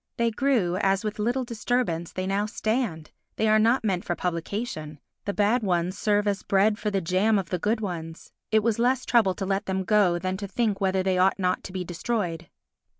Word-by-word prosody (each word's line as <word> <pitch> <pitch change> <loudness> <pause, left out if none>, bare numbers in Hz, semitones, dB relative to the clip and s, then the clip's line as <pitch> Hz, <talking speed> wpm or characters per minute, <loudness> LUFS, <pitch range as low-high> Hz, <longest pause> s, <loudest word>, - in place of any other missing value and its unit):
They 235 0 +2
grew 225 -8 +1
as, 195 0 +1
with 215 0 -4
little 240 +5 0
disturbance, 230 -7 -1
they 185 - -3
now 200 +2 0
stand; 215 -8 -2 0.2
they 220 - +1
are 215 0 +5
not 230 +4 +3
meant 190 -4 0
for 175 - -2
publication; 170 -3 -4 0.3
the 200 - 0
bad 210 +5 +2
ones 180 -2 0
serve 210 0 +1
as 200 -1 0
bread 205 +2 +2
for 210 - -1
the 195 -2 0
jam 190 +6 +2
of 190 -3 -3
the 180 - 0
good 220 +5 0
ones; 165 -5 -6 0.2
it 220 -1 +3
was 230 -1 +1
less 255 +2 +2
trouble 215 -7 +3
to 195 - -4
let 195 +1 -1
them 190 0 -1
go 195 -4 +3
than 185 +2 -2
to 200 0 -5
think 210 0 -1
whether 190 -1 +1
they 185 -1 +1
ought 190 +1 +3
not 180 -2 0
to - - -7
be 185 -1 -3
destroyed. 175 -2 -3
200 Hz, 210 wpm, -26 LUFS, 185-220 Hz, 0.3 s, are